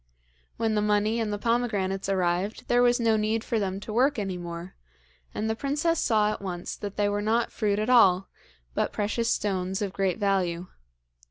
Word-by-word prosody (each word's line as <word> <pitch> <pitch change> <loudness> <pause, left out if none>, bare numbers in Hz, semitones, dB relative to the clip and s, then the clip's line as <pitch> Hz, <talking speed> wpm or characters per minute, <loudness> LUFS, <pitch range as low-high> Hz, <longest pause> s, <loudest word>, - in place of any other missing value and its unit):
When 225 -1 0
the 210 - +1
money 210 +2 +1
and 220 -2 -1
the 205 - -1
pomegranates 205 -5 -1
arrived 185 +2 -1
there 245 0 +3
was 245 0 +4
no 225 -2 +3
need 215 +1 0
for 230 - -1
them 195 -1 -2
to 215 - -6
work 265 +5 +3
any 195 -3 -2
more, 175 0 -7 0.6
and 220 - -3
the 220 - 0
princess 295 +6 0
saw 215 -2 +2
at - - -5
once 180 -3 -5
that 205 -1 -6
they 205 -1 +2
were 205 0 -1
not 225 +3 +1
fruit 205 -3 0
at 215 +1 -1
all, 195 -7 +5 0.5
but - - -1
precious 225 +3 -1
stones 190 -1 -1
of 200 -3 -3
great 195 -2 0
value. 185 -4 0
210 Hz, 190 wpm, -27 LUFS, 190-225 Hz, 0.6 s, all